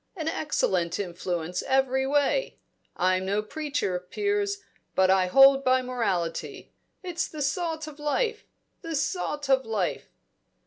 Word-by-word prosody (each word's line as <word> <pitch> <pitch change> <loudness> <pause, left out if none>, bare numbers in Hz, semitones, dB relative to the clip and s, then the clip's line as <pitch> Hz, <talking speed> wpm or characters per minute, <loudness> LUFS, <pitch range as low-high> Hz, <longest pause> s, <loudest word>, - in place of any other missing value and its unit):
An 320 -4 -4
excellent 185 - 0
influence 180 -2 -3
every 265 0 +1
way. 290 - +1 0.4
I'm 185 +1 +2
no 200 +2 0
preacher, 280 -8 -2
Piers, 405 - -1 0.4
but 190 0 +4
I 190 -1 +3
hold 270 +6 +7
by 255 0 +3
morality; 195 -10 -3 0.3
it's 360 0 -2
the 305 -2 -5
salt 320 +1 -1
of 305 -1 -11
life 440 +10 -1 0.4
the 330 -2 -4
salt 290 0 -2
of 265 -1 +3
life!" 215 -6 -2
270 Hz, 130 wpm, -27 LUFS, 190-315 Hz, 0.4 s, hold